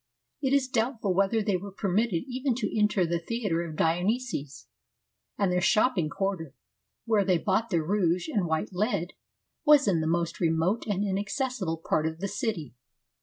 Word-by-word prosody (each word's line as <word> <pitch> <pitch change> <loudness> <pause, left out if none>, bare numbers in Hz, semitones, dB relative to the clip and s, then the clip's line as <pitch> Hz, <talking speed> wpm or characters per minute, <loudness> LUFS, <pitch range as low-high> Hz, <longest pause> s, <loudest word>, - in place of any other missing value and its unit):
It 265 -2 0
is 275 -2 +3
doubtful 230 -5 0
whether 200 +4 +2
they 200 -3 +1
were 200 +2 -8
permitted 195 -1 0
even 260 -1 -1
to 225 -3 -3
enter 210 -3 +2
the 170 0 -1
theatre 200 -3 -2
of 165 -2 -6
Dionysus; 175 - -1 0.7
and 195 -3 +1
their 180 0 +1
shopping 190 -4 +3
quarter, 185 -5 -3 0.5
where 220 -3 +3
they 185 -2 +3
bought 195 +6 0
their 170 -4 +1
rouge 175 -1 +1
and 195 -5 0
white 160 +5 -1
lead, 185 -2 -1 0.5
was 295 -4 +6
in 175 -5 +2
the 160 - -1
most 170 0 -1
remote 170 +7 +1
and 205 -1 0
inaccessible 200 - -2
part 155 0 +2
of 160 0 -4
the 200 - -2
city. 200 - -3
195 Hz, 170 wpm, -28 LUFS, 170-225 Hz, 0.7 s, was